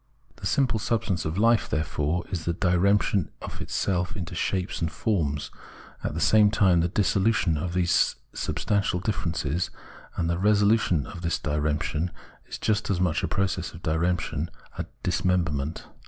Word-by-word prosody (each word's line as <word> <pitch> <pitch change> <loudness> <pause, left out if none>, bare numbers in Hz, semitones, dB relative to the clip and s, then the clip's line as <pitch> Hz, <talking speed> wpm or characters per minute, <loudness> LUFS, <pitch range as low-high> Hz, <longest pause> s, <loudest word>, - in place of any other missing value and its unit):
The - - -3
simple 125 -5 +2
substance 105 -6 -1
of 80 +3 -2
life, 115 0 +3
therefore, 80 +2 -1
is 85 -4 -3
the 85 - +1
diremption 95 0 +2
of - - -7
itself 90 -2 -1
into 90 -2 -5
shapes 90 +2 -1
and 80 - 0
forms, 75 -10 -1 0.5
and - - -1
at - - -7
the - - -2
same 105 +5 +5
time 95 -5 +4
the 85 - +2
dissolution 100 -1 +2
of 85 +3 -3
these 90 -1 +3 0.2
substantial 100 -3 0
differences; 85 -4 -1 0.5
and 85 - 0
the 85 0 0
resolution 105 - +3
of 85 - -9
this 85 -1 0
diremption 75 +2 -1 0.4
is - - -6
just 105 -1 0
as 95 -3 +1
much 90 -3 +1
a - - 0
process 95 -3 -1
of 85 - -12
diremption, 85 -1 0 0.3
a - - -4 0.2
dismemberment. 80 -5 0
90 Hz, 155 wpm, -26 LUFS, 80-100 Hz, 0.5 s, same